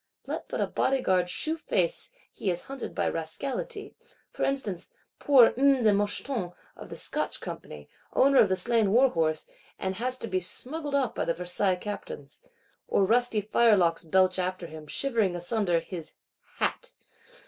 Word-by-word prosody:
Let - - -5
but - - -3
a - - +2
Bodyguard 190 -10 +1
shew 315 - -1
face, - - -1 0.2
he 195 - -3
is 175 -1 -1
hunted 275 -1 -7
by - - 0
Rascality;—for 165 - -6
instance, 220 -10 -1 0.3
poor 265 -5 +6
"M. 270 -1 +3
de 215 -2 +5
Moucheton 205 -1 -1 0.2
of - - -11
the - - -7
Scotch - - -1
Company," 75 -1 -8 0.3
owner 275 0 +5
of 205 - +5
the 190 - +2
slain 220 +1 +2
war 260 +3 +6
horse; 155 -1 0 0.3
and 190 0 -2
has 255 +3 -1
to 230 - -6
be 185 -3 0
smuggled 280 - -3
off 265 -5 +1
by - - -2
Versailles 180 +3 +1
Captains. 180 -7 -8 0.5
Or 195 - +2
rusty 230 0 +2
firelocks 200 -6 +3
belch 185 +2 +2
after 185 -1 -2
him, 155 -2 -10
shivering 220 - 0
asunder 175 0 0
his—hat. 165 -2 -6
200 Hz, 150 wpm, -28 LUFS, 180-255 Hz, 0.5 s, poor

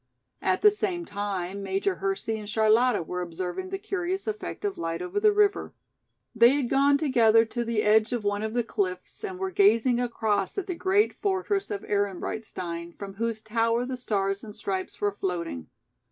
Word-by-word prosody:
At - - +1
the 420 - +8
same 380 -4 -2
time 200 - -4
Major 195 -1 -1
Hersey 195 +3 -2
and 210 -1 -8
Charlotta 220 +1 +3
were 180 +2 -4
observing 180 - -4
the 390 - -3
curious 385 -2 -3
effect 425 -1 -4
of 405 - -2
light 165 0 -2
over 365 +3 -2
the 425 0 +5
river. 410 -1 +1 0.6
They 235 +3 +6
had 270 -4 -1
gone 280 +1 +4
together 230 -6 +4
to 240 +2 -3
the 230 -2 0
edge 215 +1 +4
of 240 -3 -2
one 205 0 0
of 220 +1 -3
the 240 - +2
cliffs 185 - -3
and 380 -3 -4
were 380 0 -3
gazing 230 - +4
across 220 - -1
at 395 - -1
the 370 - -3
great 385 +5 +2
fortress 390 0 -1
of 410 -2 -4
Ehrenbreitstein 185 -4 -3
from 195 -1 -7
whose 225 +1 -3
tower 230 +2 +1
the 260 0 -3
stars 200 -5 -1
and 210 -2 -9
stripes 195 -3 -4
were 205 0 +1
floating. 175 - -4
225 Hz, 180 wpm, -27 LUFS, -, 0.6 s, the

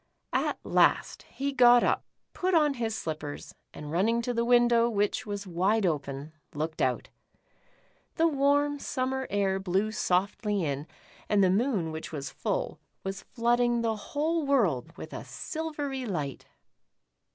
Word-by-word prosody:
At - - +1
last - - +2
he 280 +1 -3
got 245 -2 +7
up, - - +1 0.3
put 365 0 0
on 300 -3 +4
his 225 -4 -2
slippers, 155 -5 -5 0.2
and 150 0 -8
running 225 +8 +2
to 245 0 -1
the 235 0 +1
window, 240 -1 +4
which 205 -1 0
was 205 -1 -4
wide 190 +4 +1
open, 145 -2 -2 0.2
looked 155 +2 -3
out. 130 -1 0 1.1
The 330 - +4
warm 285 0 +2
summer 265 -1 -2
air 195 -1 +1
blew 195 +3 0
softly 200 0 0
in, 145 +1 -3 0.4
and 205 -1 +4
the 185 - +4
moon 200 -6 +1
which 160 0 -6
was 140 -3 -5
full, - - -2 0.2
was 195 0 -4
flooding 240 0 +1
the 225 -1 0
whole 305 +9 -1
world 190 - +1
with - - -8
a - - -5
silvery 295 -6 -4
light. 150 - -4
220 Hz, 145 wpm, -28 LUFS, 175-260 Hz, 1.1 s, got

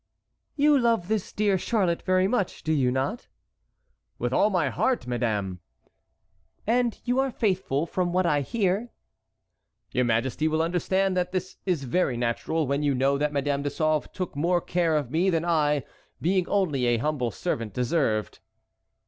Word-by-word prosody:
"You 290 -1 +4
love 230 -7 +1
this 215 -3 -1
dear 205 -3 +1
Charlotte 185 -5 0
very 185 0 +2
much, 205 -3 -1
do 160 - 0
you 135 -5 +2
not?" 135 - -2 0.9
"With - - -2
all 210 - +4
my 175 -8 +1
heart, 260 - 0
madame!" 110 -7 -2 1.1
"And 235 +1 +1
you 250 +1 +1
are 270 0 +2
faithful, 185 - 0
from 175 +1 -1
what 185 +1 +1
I 145 -4 +2
hear." 205 - 0 1.0
"Your 125 - +1
majesty 120 +6 0
will 160 +1 +1
understand 185 +3 0
that 180 0 0
this 185 0 -3
is 170 -7 0
very 130 -1 0
natural 125 +7 -1
when 140 +2 0
you 145 -2 +1
know 135 +2 +2
that 150 0 +1
Madame 140 0 0
de 145 - -1
Sauve 155 +1 0
took 185 -6 -5
more 175 +5 +2
care 170 -2 0
of 145 -5 -1
me 170 +5 +2
than 165 -2 0
I, 150 -4 +2 0.4
being 180 +1 +1
only 155 -11 +1
an 115 -1 +1
humble 145 -5 0
servant, 115 -7 -3
deserved." 120 - 0
165 Hz, 165 wpm, -26 LUFS, 140-190 Hz, 1.1 s, You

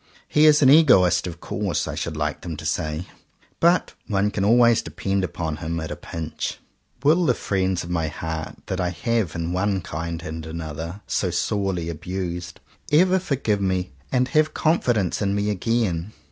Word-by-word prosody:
"He 150 +1 +5
is 150 -1 +6
an 130 - +7
egoist, 125 - +5
of 85 -1 -7
course," - - -2
I - - -3
should 80 -2 -4
like 75 0 -2
them 85 -4 -5
to 80 - -8
say, 75 +1 -2 0.5
"but 170 +2 +3
one 105 -1 +1
can 100 - -1
always 120 +2 +5
depend 95 0 -2
upon 80 -4 -3
him 85 +1 -3
at 80 -1 -5
a - - -3
pinch." 80 -2 -5 0.5
Will 160 +5 +4
the 125 -7 +3
friends 95 -2 -1
of 85 - -7
my 85 -2 0
heart, 80 +1 -5
that 95 0 -2
I 90 - 0
have, 110 0 -1
in 85 +1 -2
one 95 +1 0
kind 85 +1 -5
and 80 -1 -5
another, 80 +3 -6
so 95 - 0
sorely 90 -1 -1
abused, 85 +1 -5 0.3
ever 180 +5 +5
forgive 130 - -1
me, 95 -2 0 0.2
and 125 -1 +2
have 155 -1 +2
confidence 120 - +1
in 100 -1 +1
me 100 +1 0
again? 105 -3 -1
95 Hz, 175 wpm, -23 LUFS, 85-115 Hz, 0.5 s, an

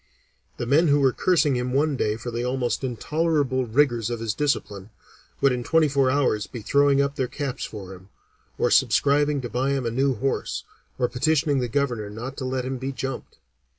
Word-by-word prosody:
The - - -3
men 150 +7 +4
who 145 0 +4
were 135 -2 +4
cursing 160 -7 +2
him 125 0 -2
one 145 +1 +2
day 105 -4 0
for 120 +2 -6
the 120 +1 -3
almost 125 0 -1
intolerable 135 0 0
rigors 120 -2 +2
of 120 -1 -3
his 115 -2 -2
discipline, 105 -9 -2 0.5
would 140 - +4
in 125 -1 -2
twenty 160 +3 +3
four 135 -2 +2
hours 130 -6 +1
be 120 -4 -8
throwing 140 +3 +3
up 140 +1 -3
their 130 -3 0
caps 135 0 -4
for 95 -3 -8
him, 95 +1 -15 0.5
or - - +1
subscribing 145 0 +3
to 125 - -4
buy 130 +4 0
him 135 -3 -2
a 115 - -1
new 135 +2 +1
horse, 135 +5 -2 0.3
or 125 - +1
petitioning 145 +1 +1
the 125 - -1
Governor 120 -5 -1
not 120 +6 -7
to 130 - -4
let 130 0 -2
him 130 0 -3
be 135 +2 -3
jumped. 135 0 -6
130 Hz, 200 wpm, -24 LUFS, 120-140 Hz, 0.5 s, men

